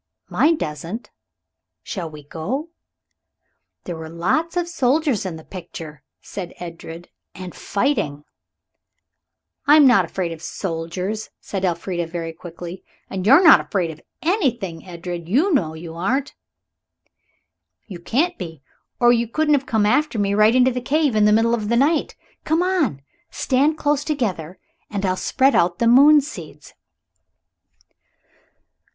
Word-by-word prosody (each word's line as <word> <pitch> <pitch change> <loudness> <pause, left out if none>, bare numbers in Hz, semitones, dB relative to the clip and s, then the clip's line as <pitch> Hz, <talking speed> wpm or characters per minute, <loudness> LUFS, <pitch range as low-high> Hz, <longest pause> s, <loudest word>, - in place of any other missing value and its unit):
"Mine 325 +1 +3
doesn't. 165 - -5 0.7
Shall 180 -6 -5
we 150 -1 -11
go?" 240 - -4 1.1
"There 175 - -5
were 160 0 -8
lots 315 - -1
of 350 -1 0
soldiers 280 - +1
in 175 - -5
the 160 - -11
picture," 165 -5 -9 0.2
said 185 -4 -7
Edred, 170 0 -9 0.3
"and 185 -1 -8
fighting." 200 - -1 1.4
"I'm 295 0 +7
not 240 -8 +6
afraid 175 0 -3
of 165 -1 -8
soldiers," 180 +5 -4
said 195 -2 -5
Elfrida 175 -1 -1
very 165 -1 -5
quickly, 175 +2 -9 0.3
"and 190 0 -3
you're 280 +10 +7
not 325 - +9
afraid 180 -6 -2
of 155 - -13 0.2
anything, 240 - -1
Edred 175 -1 -6
you 315 - +3
know 160 - +1
you 160 0 -8
aren't." 245 +12 -1 1.5
"You 185 -5 -9
can't 300 - 0
be 165 -6 -8 0.4
or 240 0 +6
you 235 0 +1
couldn't 300 +6 +1
have 275 -1 +1
come 220 -2 +2
after 255 +4 +2
me 200 -1 +1
right 215 +3 +4
into 255 0 +5
the 250 0 -3
cave 285 -1 +1
in 210 -1 +4
the 210 - +5
middle 225 +2 +3
of 215 -3 -1
the 235 - +2
night. 300 +5 +2 0.3
Come 320 +3 +1
on. 310 - 0 0.3
Stand 285 +4 +1
close 295 -1 +1
together 190 - -3 0.3
and 200 -1 -2
I'll 185 -1 +1
spread 265 +8 +2
out 175 0 +2
the 235 - 0
moon 285 +6 +7
seeds." 285 - -10
210 Hz, 145 wpm, -21 LUFS, 170-275 Hz, 1.5 s, not